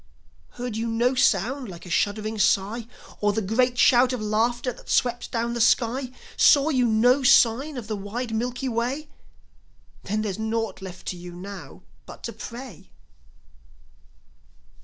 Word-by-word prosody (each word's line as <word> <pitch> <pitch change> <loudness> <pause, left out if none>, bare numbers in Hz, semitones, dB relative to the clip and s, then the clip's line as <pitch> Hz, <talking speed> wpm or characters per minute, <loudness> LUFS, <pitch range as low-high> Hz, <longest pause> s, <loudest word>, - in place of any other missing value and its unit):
Heard 245 -2 -4
you 230 +1 -2
no 235 +3 +1
sound 250 +1 +1
like 175 -1 -10
a - - -9
shuddering 215 +4 -1
sigh! 215 +3 +1 0.3
Or 205 0 +1
the 220 - -1
great 245 +5 +1
shout 245 +1 +5
of 250 - -2
laughter 235 +4 0
that - - -16
swept 245 -1 +1
down 235 0 -1
the 235 - -2
sky? 245 +3 +2 0.3
Saw 285 +1 +5
you 255 -5 +2
no 245 +5 +4
sign 265 +2 +4
on 240 - -5
the 215 0 -3
wide 225 +4 -5
Milky 245 +3 -2
Way? 255 +6 -2 0.9
Then 215 +2 -2
there's 205 -1 -3
naught 220 -2 -2
left 185 -2 -9
to 180 - -5
you 175 0 -9
now 195 +3 -9 0.2
but - - -12
to - - -5
pray. 240 - -9
230 Hz, 155 wpm, -25 LUFS, 210-250 Hz, 0.9 s, shout